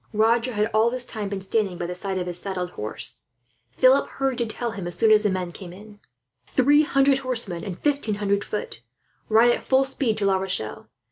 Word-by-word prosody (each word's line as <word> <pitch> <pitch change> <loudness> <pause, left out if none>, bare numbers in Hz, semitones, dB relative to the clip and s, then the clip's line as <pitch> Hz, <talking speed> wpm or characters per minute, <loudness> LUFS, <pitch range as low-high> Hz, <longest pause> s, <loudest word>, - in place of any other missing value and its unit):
Roger 230 +3 +2
had, 210 0 +1
all 220 +2 +4
this 250 0 -1
time, 215 -4 -5
been 195 -1 -4
standing 195 -2 -1
by 175 - -3
the 175 - -4
side 190 +1 -4
of 180 - -2
his 175 -1 -3
saddled 180 -2 -4
horse. 105 -7 -4 0.5
Philip 255 - +4
hurried 270 -2 -2
to 235 +2 -3
him, 195 -5 -6
as 175 - -4
soon 225 -1 +3
as 215 -1 +6
the 210 - +1
men 185 -2 -2
came 175 0 -10
in. 205 +3 -14 0.5
"Three 290 +3 +4
hundred 275 -2 +3
horsemen 230 -10 -3
and 180 -3 -5
fifteen 280 -8 0
hundred 200 0 0
foot! 210 - -5 0.5
Ride 225 +2 +5
at - - -2
full 265 +1 +3
speed 265 -4 0
to 205 - -1
La 195 -1 +3
Rochelle. 185 - -4
210 Hz, 210 wpm, -24 LUFS, 190-245 Hz, 0.5 s, as